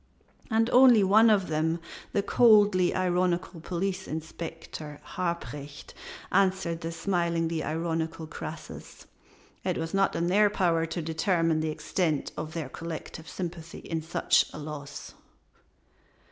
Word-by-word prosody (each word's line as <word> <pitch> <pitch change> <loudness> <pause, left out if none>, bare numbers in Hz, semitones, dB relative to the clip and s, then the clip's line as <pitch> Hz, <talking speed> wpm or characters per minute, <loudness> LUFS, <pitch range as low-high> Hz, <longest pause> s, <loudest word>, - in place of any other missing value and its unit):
And 225 0 +2
only 250 -4 +7
one 215 +4 +6
of 200 -4 +3
them, 160 +2 0 0.3
the 200 - +1
coldly 205 -5 +5
ironical 180 -1 0
Police 190 +2 -3
Inspector 160 -1 -7 0.2
Harprecht, 150 -5 -4 0.4
answered 185 -4 +1
the 165 - -4
smilingly 165 -1 0
ironical 165 0 -2
Croesus: 160 - -9 0.6
"It - - -1
was 165 0 -4
not 195 0 +2
in 170 - 0
their 205 +4 +4
power 170 -5 +1
to 165 +1 -4
determine 165 0 +1
the 155 0 -1
extent 155 -1 -1
of 155 +1 -6
their 160 -5 -3
collective 160 +1 -7
sympathy 170 -2 -6
in 165 -1 -3
such 160 +2 +2
a - - -9
loss." 145 -1 -7
170 Hz, 125 wpm, -28 LUFS, 160-190 Hz, 0.6 s, only